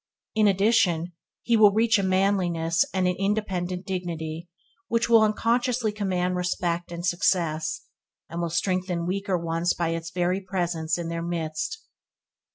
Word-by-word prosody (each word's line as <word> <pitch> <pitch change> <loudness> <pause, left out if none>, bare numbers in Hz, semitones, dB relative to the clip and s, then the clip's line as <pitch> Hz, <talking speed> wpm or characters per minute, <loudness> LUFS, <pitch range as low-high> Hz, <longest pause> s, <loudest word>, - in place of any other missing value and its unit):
In 215 -1 +4
addition 190 -4 +2 0.3
he 235 - +2
will 215 -2 +7
reach 225 0 +3
a - - +2
manliness 185 -4 +2
and 185 -1 +1
an 180 - +1
independent 190 -3 -1
dignity 170 -3 -4 0.4
which 230 0 +1
will 230 -1 +6
unconsciously 230 +2 +1
command 185 -3 -1
respect 175 -1 -2
and 170 0 -5
success, 160 -4 0 0.5
and 170 +2 -5
will 170 - -1
strengthen 180 0 -1
weaker 195 +1 -1
ones 170 +1 -1
by 170 -1 -1
its 165 0 -3
very 180 +2 0
presence 175 -4 -1
in 170 -1 -4
their 170 0 -3
midst. 170 - -3
180 Hz, 145 wpm, -25 LUFS, 170-200 Hz, 0.5 s, will